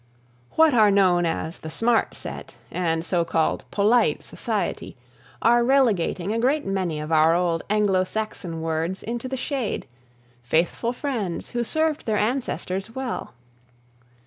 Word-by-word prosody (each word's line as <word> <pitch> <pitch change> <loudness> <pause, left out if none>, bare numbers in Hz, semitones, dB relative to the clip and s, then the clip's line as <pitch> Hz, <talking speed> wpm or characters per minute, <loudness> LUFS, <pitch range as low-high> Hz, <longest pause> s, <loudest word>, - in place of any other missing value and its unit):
What 320 -2 +5
are 215 -3 +6
known 185 -3 +4
as 165 0 -3
the 160 - -7
Smart 230 +7 +1
Set - - -8 0.2
and 165 -2 -1
so 175 -2 +1
called 165 -1 0
polite 215 +4 +2
society, - - -3 0.5
are 240 +1 +5
relegating 215 -7 +2
a 230 - 0
great 275 +5 +1
many 185 -5 -1
of 150 +1 -5
our 160 +1 +5
old 170 -2 +1
Anglo 205 -3 +3
Saxon 185 -5 -4
words 165 +3 -2
into 235 +3 -4
the 265 +1 -3
shade, 260 -4 -2 0.6
faithful 165 - 0
friends 240 - -3
who 240 0 -1
served 315 +3 -1
their 215 -1 +1
ancestors 220 -3 -2
well. 260 - -4
200 Hz, 140 wpm, -24 LUFS, 170-240 Hz, 0.6 s, are